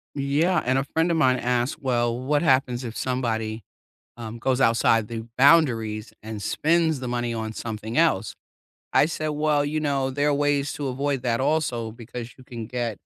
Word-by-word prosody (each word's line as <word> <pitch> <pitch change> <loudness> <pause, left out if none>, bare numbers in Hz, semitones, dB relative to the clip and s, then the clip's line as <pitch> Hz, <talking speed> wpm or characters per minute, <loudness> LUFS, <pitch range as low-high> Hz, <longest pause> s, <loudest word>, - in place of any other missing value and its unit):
Yeah, 150 +5 +1
and 130 +2 +1
a 135 - +1
friend 160 +4 0
of 165 - +1
mine 130 -4 +3
asked, 125 +2 -1
"Well, 120 -2 0
what 145 +5 0
happens 130 -3 +2
if 115 -2 -6
somebody, 115 -4 -2 0.5
um, 115 0 -7
goes 130 +1 0
outside 115 -2 +3
the 115 -1 -6
boundaries 120 -7 +3
and 110 -1 -6
spends 160 - +1
the 125 - -4
money 120 -1 -2
on 110 -1 -4
something 110 +2 -4
else?" 135 -12 +2 0.6
I - - +5
said, 155 -1 -3
"Well, 150 -1 +1
you 155 +2 -1
know, 140 -3 0
there 145 +2 +1
are - - +2
ways 145 0 +1
to 145 -2 -4
avoid 135 0 -1
that 120 -2 0
also 130 -6 0
because 115 0 -8
you 130 - -15
can 115 -3 -7
get 120 -2 -3
130 Hz, 185 wpm, -24 LUFS, 115-145 Hz, 0.6 s, I